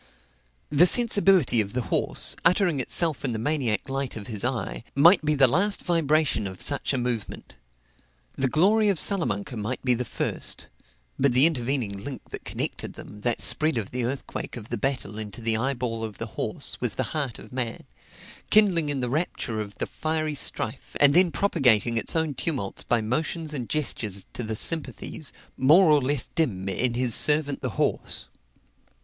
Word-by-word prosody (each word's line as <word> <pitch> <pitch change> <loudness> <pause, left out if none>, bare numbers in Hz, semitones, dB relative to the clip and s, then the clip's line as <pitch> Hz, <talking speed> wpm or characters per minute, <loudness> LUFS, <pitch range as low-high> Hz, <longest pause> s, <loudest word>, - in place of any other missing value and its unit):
The 160 +5 +6
sensibility 195 - +4
of 100 -1 -5
the 125 0 -1
horse, 95 - +2
uttering 175 -3 +3
itself 155 +4 +1
in 130 -4 -1
the - - -2
maniac 125 -3 -1
light 135 -2 -3
of 105 - -8
his 110 -4 -1
eye, 120 -4 -3
might 165 +6 +6
be 150 0 +1
the 135 -2 +6
last 190 - +1
vibration 155 - +1
of 95 -1 -9
such 140 -1 0
a 135 - 0
movement; 120 -3 -4 0.8
the 135 - 0
glory 205 - +3
of 190 -5 +1
Salamanca 130 - 0
might 110 +6 -4
be 125 - +3
the 125 +1 -1
first 115 - -2 0.5
but 135 -2 +3
the 130 +4 +5
intervening 120 -9 -1
link 140 +1 -8
that - - -6
connected - - -4
them, 105 0 -11
that 120 +1 0
spread 155 0 +2
the 120 +2 -3
earthquake 130 0 -4
of 110 -2 -10
the 120 - -3
battle 125 -6 -2
into 105 0 -7
the 115 -1 +1
eyeball 120 -2 -2
of 110 -3 -6
the - - -4
horse, - - -3
was - - -1
the - - -1
heart 145 -6 -2
of - - -13
man 125 -3 -4 0.7
kindling 185 -8 +4
in 140 -2 -2
the 125 - -1
rapture 130 -6 -2
of 105 -1 -6
the - - -2
fiery 155 -1 -2
strife, 130 -3 -3
and 140 -1 +6
then 180 +2 +5
propagating 125 - +2
its 115 - 0
own 160 -2 0
tumults 130 -7 -3
by 120 -2 0
motions 155 +7 -2
and 125 -5 -5
gestures 110 -9 -1
to - - -5
the 110 -1 -3
sympathies, 160 +2 -1 0.3
more 155 +6 +6
or 150 -1 +5
less 135 0 -1
dim, 100 - -1
in 120 +5 0
his 125 -1 +3
servant 150 +1 +2
the 130 - -2
horse. - - -1
135 Hz, 180 wpm, -25 LUFS, 115-155 Hz, 0.8 s, The